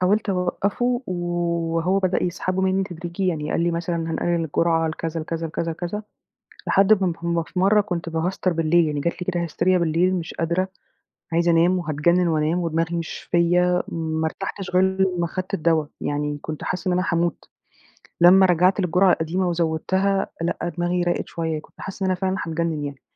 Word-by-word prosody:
حاولت 205 +3 +2
أوقفه 200 +7 0
و 185 - -3 0.6
وهو 180 +4 +2
بدأ 185 -1 0
يسحبه 185 +1 -1
مني 190 0 +2
تدريجيًا 175 +2 -4
يعني، 155 -4 -1
قال - - 0
لي 170 +1 +2
مثلًا: 170 0 -2
"هنقلل 165 +1 -1
الجرعة 165 +1 +1
لكذا 165 +1 -4
لكذا 165 +1 -3
لكذا 165 +1 -3
لكذا." 180 +6 -4 0.6
لحد 195 0 +4
ما 180 -2 +2
ما 170 0 0
في 180 - -7
مرة 200 +3 +4
كنت 175 -5 -3
باهستر 175 +3 -1
بالليل 165 +1 +3
يعني 150 -1 -2
جات 170 +4 0
لي 180 - -8
كده 175 -1 -1
هستيريا 180 +3 +1
بالليل، 170 +3 +2
مش 170 -3 -4
قادرة، 170 +3 0 0.7
عايزة 170 +1 +3
أنام 170 +2 +4
وهاتجنن 170 +3 +2
وأنام 160 +2 +1
ودماغي 165 0 -1
مش 165 -1 -5
فيَّ، 180 +1 +3
ما 160 -1 -2
ارتحتش 195 +4 -4
غير 185 +1 +4
لما 190 -2 +1
أخدت 185 +3 -5
الدوا، 160 -4 +2 0.2
يعني 145 0 -2
كنت 155 -1 -6
حاسة 185 +1 -3
إن 180 - +2
أنا 180 - +1
هاموت، 170 -1 -1 0.7
لما 185 +2 +8
رجعت 180 +3 +3
للجرعة 180 +1 +4
القديمة 180 +3 0
وزوّدتها 175 +4 0
لأ، 170 +1 -2
دماغي 175 +1 +1
راقت 175 0 -1
شوية، 160 -2 -3
كنت - - -22
حاسة 195 0 -5
إن 190 - +1
أنا - - +2
فعلًا 190 0 0
هاتجنن 165 -2 -2
يعني. 140 -2 -7
175 Hz, 180 wpm, -23 LUFS, 165-185 Hz, 0.7 s, لما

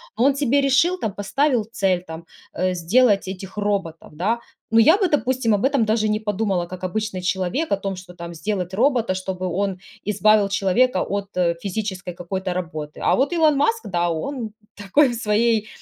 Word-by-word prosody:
Он 270 +4 +3
тебе 280 0 +2
решил, 330 +7 +3
там, 210 - -2
поставил 245 +5 +1
цель, 185 -4 0
там, 160 +1 -8 0.3
э, 185 +1 0
сделать 200 +4 +3
этих 190 +1 -7
роботов, 200 -7 -2
да. 210 +9 0 0.3
Но, 230 - +6
я 320 - +6
бы, 380 -5 +1
допустим, 260 -5 +1
об 205 - 0
этом 275 -4 +2
даже 215 0 +1
не 215 0 +1
подумала, 205 -4 -1
как 185 +1 -9
обычный 200 0 -3
человек, 190 - -1
о - - +2
том, 195 -1 -4
что, 180 -1 -11
там, 170 -1 -8
сделать 180 +2 -3
робота, 235 -3 +2
чтобы 185 0 -4
он 190 +1 -2 0.3
избавил 210 0 +3
человека 195 +3 +2
от 200 0 -3 0.3
физической 195 -2 -4
какой-то 185 +2 -4
работы. 155 -4 -5
А - - +3
вот 280 +6 +1
Илон 310 -4 +3
Маск, 455 +9 +1
да, 175 -1 0
он 220 - -3 0.2
такой 210 +8 +3
в 240 - -3
своей, 220 0 +1
205 Hz, 180 wpm, -22 LUFS, 185-245 Hz, 0.3 s, Но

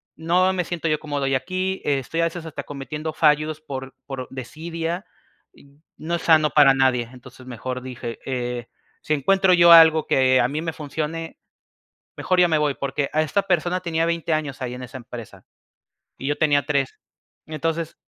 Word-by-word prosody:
no 180 +3 +2
me 180 -1 -1
siento 170 -2 -4
yo 155 -1 +1
cómodo 145 -2 -3
ya 135 0 +2
aquí, 185 +5 -3
estoy 145 +3 -1
a - - +3
veces 165 0 -4
hasta 160 - -6
cometiendo 150 +2 -6
fallos 155 0 +2
por 135 -3 -7
por 130 -2 -6
desidia, 165 - -5 0.5
y 140 - -20 0.3
no 170 +2 -3
es 170 - -4
sano 155 -2 +4
para 140 -1 +6
nadie". 125 -3 +1
Entonces, 125 0 -14
mejor 130 +1 -5
dije: 120 -3 -7
"Eh, 125 -2 -3 0.3
si 155 - -1
encuentro 190 +6 +3
yo 170 -1 +7
algo 160 -1 +8
que 130 -1 +4
a 120 - +3
mí 150 +4 -3
me 165 -1 -3
funcione, 160 +2 -5 0.8
mejor 185 - 0
ya 175 - +5
me 160 -2 +2
voy", 150 -2 +1
porque 140 +1 -2
a 155 - +2
esta 195 +6 0
persona 180 -1 0
tenía 165 -2 -1
20 170 -1 -1
años 150 -3 -2
ahí 125 -1 -4
en 125 - -8
esa 125 +2 -8
empresa, 120 -2 -10 0.7
y 135 - -5
yo 145 - -1
tenía 145 -2 +3
3, 140 -2 -1 0.5
entonces 160 +1 -3
150 Hz, 180 wpm, -23 LUFS, 135-165 Hz, 0.8 s, algo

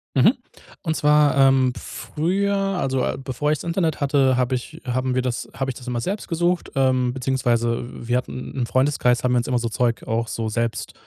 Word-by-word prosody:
Mhm, - - +6 0.5
und 160 -2 -1
zwar, 150 -1 +4
ähm, 135 -2 +4
früher, 195 +6 -1
also, 180 -10 0
äh, - - -1
bevor 145 +3 -1
ich's 150 - -1
Internet 170 -3 -1
hatte, 135 -2 +3
hab 125 0 +1
ich 130 +6 -4
haben 130 +1 -1
wir 130 - +2
das 125 -1 -3
habe 135 0 -2
ich - - -11
das 125 0 -11
immer 120 -1 -2
selbst 200 - -3
gesucht. 175 +1 0
Ähm, 130 -2 +2
beziehungsweise 120 -3 0 0.2
wir 125 - +2
hatten 125 0 -5
im 125 - 0
Freundeskreis 130 -2 +2
haben 125 0 +2
wir - - +3
uns 120 - 0
immer 125 -1 +1
so 115 -1 -2
Zeug 120 0 0
auch 115 +1 0
so 115 -1 -3
selbst, 115 +1 -2
130 Hz, 200 wpm, -22 LUFS, 125-150 Hz, 0.5 s, Mhm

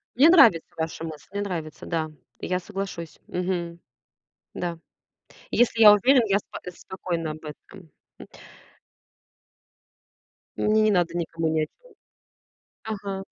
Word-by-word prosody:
Мне 290 +6 +7
нравится 250 - +6
ваша 160 0 -4
мысль, 155 -3 -8
мне 200 - -3
нравится. 165 -6 -5
Да, 160 -2 -2 0.3
я 180 0 -1
соглашусь. 185 -4 -6
Мгм. 175 -2 -3 0.8
Да. 170 -2 -4 0.7
Если 235 -1 +2
я 210 - +11
уверен, 250 +4 +5
я 200 -1 +2
спо - - -10
э, 180 - -7
спокойна 170 -3 -4
об 155 +1 -10
этом, 160 +3 -12 0.3
м. - - -11 2.3
Мне 215 +1 +3
не 215 - +4
надо 175 -3 +1
никому 165 -1 -2
ни 155 0 +1
о 155 - +1
чем - - -23 0.9
Ага. 200 -3 -5
180 Hz, 130 wpm, -25 LUFS, 165-210 Hz, 2.3 s, я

